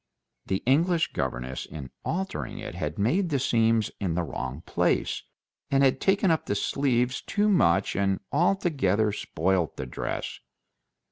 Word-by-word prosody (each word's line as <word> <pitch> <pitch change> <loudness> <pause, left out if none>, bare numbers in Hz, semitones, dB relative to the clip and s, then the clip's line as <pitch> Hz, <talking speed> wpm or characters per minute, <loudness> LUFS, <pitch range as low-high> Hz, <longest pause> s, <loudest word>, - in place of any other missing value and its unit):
The 95 0 -1
English 165 +6 +2
governess 65 +1 -3
in 70 -4 -8
altering 190 +3 -3
it - - -6
had - - -4
made 170 - +1
the 145 - +1
seams 115 -4 +2
in 90 -5 -1
the 90 - 0
wrong 65 -1 -5
place, - - 0 0.5
had 135 -1 +3
taken 195 -2 +3
up 160 - 0
the 100 - 0
sleeves 125 +2 +1
too 210 +1 0
much, 95 - +3
and 95 0 +1
altogether 140 - +2
spoilt 90 -2 -1
the - - -4
dress. 65 - -4
115 Hz, 140 wpm, -27 LUFS, -, 0.5 s, had